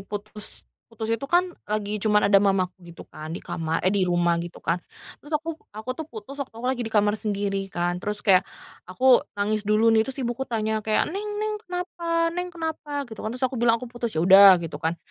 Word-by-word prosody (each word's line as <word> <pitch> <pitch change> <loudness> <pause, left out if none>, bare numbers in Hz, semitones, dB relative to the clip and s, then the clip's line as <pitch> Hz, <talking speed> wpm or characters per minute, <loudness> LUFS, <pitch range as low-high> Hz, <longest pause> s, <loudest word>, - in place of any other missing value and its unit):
putus 210 +1 -6 0.2
putus 225 -1 -5
itu 230 +5 -2
kan 355 +1 +2 0.2
lagi 210 0 -2
cuman 210 -1 +3
ada 200 - +9
mamaku 195 -2 +2 0.2
gitu 170 - -10
kan 155 +1 -8
di - - -7
kamar 160 0 -2
eh, 185 - +3
di 190 -3 +1
rumah 175 -1 +2
gitu 175 0 -7
kan, 175 - 0 0.4
terus 295 - -13
aku 320 +2 -5 0.2
aku 215 +4 -7
tuh 310 +4 -7
putus 250 +4 -9
waktu 255 - -6
aku 230 - -8
lagi 260 -2 -3
di - - -2
kamar 210 -1 +2
sendiri 200 -2 -2
kan, 175 0 -2
terus 210 +1 -3
kayak 190 -3 +6 0.5
aku 250 +7 +5 0.2
nangis 210 +1 -1
dulu 220 +2 +4
nih, 220 - +5
terus 265 - -5
ibuku 240 +2 -3
tanya 220 -1 -1
kayak, 215 0 +1
"Neng 415 +2 -4
neng 430 0 -1
kenapa? 340 -3 -2
Neng 360 +1 -3
kenapa?" 315 -4 -4
Gitu 220 -4 -10
kan, 215 - -3
terus 255 - -1
aku 255 0 -1
bilang, 230 -1 +4
"Aku 240 - -7
putus." 240 -5 -4
ya - - +2
udah 195 0 +9
gitu 165 -2 -6
kan, 165 +1 -1
215 Hz, 220 wpm, -25 LUFS, 195-265 Hz, 0.5 s, ada